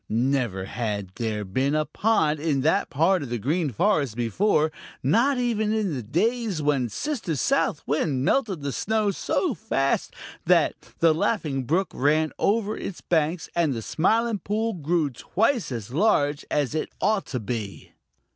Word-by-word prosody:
Never 120 -5 0
had 105 -4 -3
there 110 -3 -2
been 130 +10 0
a 155 0 +1
pond 160 -9 +1
in 145 -3 0
that 160 +8 +2
part 170 +5 +2
of 140 - -5
the 120 - -1
Green 150 - 0
Forest 140 - +1
before, 155 - +1 0.3
not 235 - +3
even 225 -4 0
in 215 -6 0
the 130 - -3
days 210 - 0
when 145 -5 +1
Sister 230 - -3
South 215 - +1
Wind 140 -2 0
melted 205 - +1
the 140 - -2
snow 215 +5 0
so 310 - -1
fast 135 -12 -1 0.3
that - - +4 0.2
the 165 -1 +4
Laughing 155 - -1
Brook 180 +8 0
ran 155 +3 +2
over 215 0 +1
its 190 - -6
banks 160 0 0
and 160 -6 +2
the 115 - -4
Smiling 225 - +1
Pool 220 +5 -1
grew 160 -3 0
twice 220 - 0
as 115 -2 -5
large 145 -5 +2
as 145 -4 0
it 155 - -2
ought 210 0 +1
to 125 - -3
be. 110 -3 -5
155 Hz, 160 wpm, -25 LUFS, 130-210 Hz, 0.3 s, that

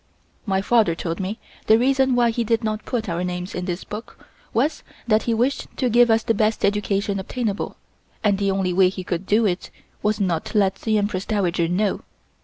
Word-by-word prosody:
My 190 -1 +1
father 215 -7 +3
told 165 0 -4
me 195 +3 -3 0.3
the 220 - +7
reason 265 +1 +3
why 240 -1 +3
he 235 +1 -1
did 230 +1 0
not 215 -1 -2
put 235 -4 -2
our 170 0 -2
names 180 +1 -4
in 180 - -3
this 180 0 -3
book 215 +3 -8 0.3
was, 285 +7 0 0.3
that 215 -1 +4
he - - +3
wished 250 +5 0
to 250 -3 +1
give 240 +1 +5
us 225 0 +3
the 225 - +1
best 215 +1 +1
education 200 0 0
obtainable, 210 +1 -3 0.5
and 200 -2 +2
the 200 -1 +1
only 190 -2 0
way 185 0 +5
he 185 0 -6
could 175 +1 -3
do 220 +2 +3
it 180 -3 -1 0.3
was 210 0 0
not 175 -5 0
to - - -3
let 195 -2 +3
the 220 -1 0
Empress 200 -2 -1
Dowager 180 -5 +1
know. 190 +4 0
205 Hz, 210 wpm, -22 LUFS, 185-225 Hz, 0.5 s, the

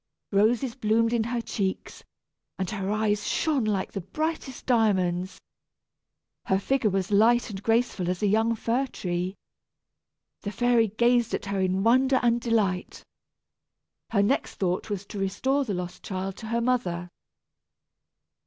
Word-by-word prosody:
Roses 225 +5 +2
bloomed 230 -1 +1
in 230 -2 +1
her 235 0 -2
cheeks, 195 -4 -4 0.5
and 190 - -2
her 195 -2 -3
eyes 210 0 0
shone 290 -7 +1
like 200 -3 -1
the 195 - -4
brightest 285 - -4
diamonds. 190 -6 +1 1.1
Her 190 - +2
figure 240 +3 +1
was 195 0 -1
light 230 +3 +4
and 195 -1 -6
graceful 225 -5 +1
as 180 +3 -2
a - - +4
young 220 +3 +2
fir 240 +5 0
tree. 180 -3 -3 1.1
The 205 - -4
fairy 240 0 +3
gazed 235 +2 +2
at - - -5
her 200 -1 -2
in 185 +1 +1
wonder 260 +3 +4
and 235 0 +3
delight. 210 -6 -1 1.1
Her 200 -3 +2
next 255 +7 0
thought 185 +2 -1
was 200 -1 -3
to 205 - -7
restore 265 +9 0
the 205 -5 -2
lost 180 0 -6
child 190 0 -4
to 220 - -8
her 235 +1 0
mother. 205 -9 0
215 Hz, 145 wpm, -26 LUFS, 190-235 Hz, 1.1 s, light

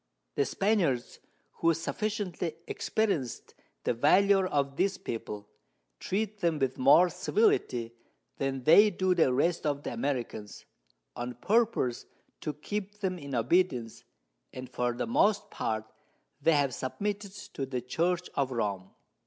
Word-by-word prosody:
The 140 - +1
Spaniards, 180 - 0 0.4
who 165 -1 +3
sufficiently 180 -2 -3
experienc'd 170 - -2 0.3
the - - +1
Valour 190 +10 +4
of 140 -4 0
this 190 +5 +1
People, 105 -2 -6 0.5
treat 210 +1 -2
them 170 -4 +1
with 135 -3 -1
more 140 +7 +7
Civility 175 - +1 0.4
than 135 -2 -2
they 200 - +7
do 185 -2 +1
the 160 -7 +3
rest 165 +7 +1
of 145 -1 -1
the - - -4
Americans, 120 -4 -4 0.5
on 120 0 -5
purpose 205 - +1 0.3
to 150 - -3
keep 205 +7 -5
them 185 -2 -1
in 140 -3 -5
Obedience, 125 -3 +1 0.5
and 130 0 -7
for 120 0 0
the 120 - -2
most 215 -6 +2
part 110 -1 -2 0.6
they 165 +3 +4
have 140 -3 +2
submitted 200 - -3 0.2
to 135 - -3
the 130 -2 -3
Church 170 +8 0
of 140 -2 0
Rome. 100 -6 -2
150 Hz, 135 wpm, -29 LUFS, 125-195 Hz, 0.6 s, more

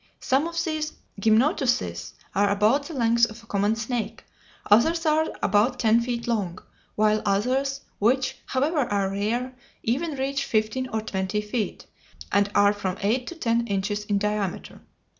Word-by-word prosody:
Some 275 +5 +1
of 335 - -7
these 310 -1 -2 0.3
gymnotuses 220 - +1 0.2
are 200 +1 +3
about 215 +8 +2
the 325 - -7
length 235 -1 +3
of 225 +1 -12
a - - -16
common 205 0 +1
snake, 225 +1 -4 0.4
others 325 +11 +4
are 315 0 +3 0.2
about 210 +6 +3
ten 225 0 +3
feet 235 -1 -3
long, 200 -7 -1 0.4
while 215 0 +3
others, 260 +8 0 0.2
which, 255 +5 +1
however, 290 +5 0
are 200 -7 0
rare, 230 +6 -1 0.3
even 285 +7 -1
reach 275 +1 -1
fifteen 220 +4 0
or 220 -2 -2
twenty 190 -1 -2
feet, 210 +1 -3 0.5
and 200 0 +3
are 205 0 +5
from 195 -2 -3
eight 240 +5 +1
to 345 - -6
ten 235 -6 0
inches 200 +1 -1
in 205 -1 +1
diameter. 210 -2 -3
225 Hz, 155 wpm, -25 LUFS, 205-260 Hz, 0.5 s, are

